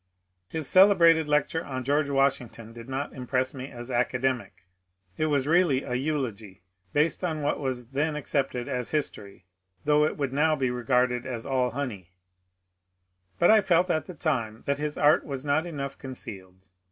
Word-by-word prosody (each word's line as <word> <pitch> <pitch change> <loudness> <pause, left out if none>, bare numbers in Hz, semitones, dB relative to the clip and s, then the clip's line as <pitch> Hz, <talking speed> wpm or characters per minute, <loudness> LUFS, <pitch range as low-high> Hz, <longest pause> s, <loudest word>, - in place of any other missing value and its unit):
His 160 -3 -2
celebrated 170 -5 +6
lecture 150 +2 +1
on 130 -2 -5
George 145 +2 +1
Washington 135 -5 -1
did 115 +2 -11
not 135 +2 -3
impress 130 +1 -1
me 130 0 -7
as 120 +1 -9
academic; 125 -5 -1 0.5
it 155 - 0
was 140 -3 +1
really 155 -4 +3
a 125 - -5
eulogy, 125 - -3 0.3
based 155 - +1
on 160 -4 -2
what 145 - 0
was 125 -4 -4
then 150 +3 -1
accepted 135 -4 -2
as 125 -1 -3
history, 100 - -4 0.4
though 150 0 +4
it 155 - 0
would 140 -3 -2
now 155 +2 +3
be 130 -4 0
regarded 125 0 +1
as 120 -3 -5
all 130 -2 +1
honey; 115 -9 -5 1.3
but 175 - +5
I 220 -1 +6
felt 180 -1 +2
at 155 - -1
the 180 - -8
time 115 -9 -2
that 140 0 -1
his 150 0 -3
art 150 +1 +4
was 140 -1 -6
not 150 +4 +1
enough 140 -4 -5
concealed. 95 - -10
135 Hz, 165 wpm, -27 LUFS, 125-150 Hz, 1.3 s, celebrated